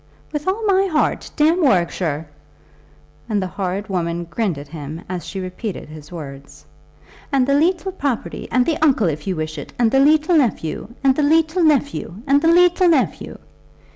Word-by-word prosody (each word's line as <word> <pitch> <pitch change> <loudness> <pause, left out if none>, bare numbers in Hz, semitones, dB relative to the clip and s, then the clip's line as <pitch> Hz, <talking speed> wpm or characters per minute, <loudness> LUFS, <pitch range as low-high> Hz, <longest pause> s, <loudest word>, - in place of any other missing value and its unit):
"With 295 +2 -4
all 420 +4 0
my 390 -1 +3
heart. 315 -4 0
Damn 325 +4 +3
Warwickshire." 170 - +1 1.0
And 210 -2 +1
the 190 - -1
horrid 190 +2 -3
woman 175 -3 -2
grinned 170 0 -2
at 140 0 -9
him 155 +1 -7
as 180 -1 -5
she 195 - -5
repeated 185 0 -6
his 155 0 -12
words. 140 -4 -10 0.7
"And 270 -3 +3
the 280 - +1
leetle 350 +6 +1
property, 280 -10 -3
and 250 -1 +3
the 320 -2 -1
uncle, 270 - +3
if 150 +1 -5
you 190 - 0
wish 155 -1 -4
it; - - -10
and 235 -2 +2
the 270 - +4
leetle 310 +4 +4
nephew, 215 - -1 0.2
and 265 -1 +4
the 300 - +1
leetle 320 +4 +2
nephew, 285 - +1
and 280 0 +3
the 325 - +2
leetle 355 +1 +5
nephew!" 305 -6 0
245 Hz, 175 wpm, -20 LUFS, -, 1.0 s, leetle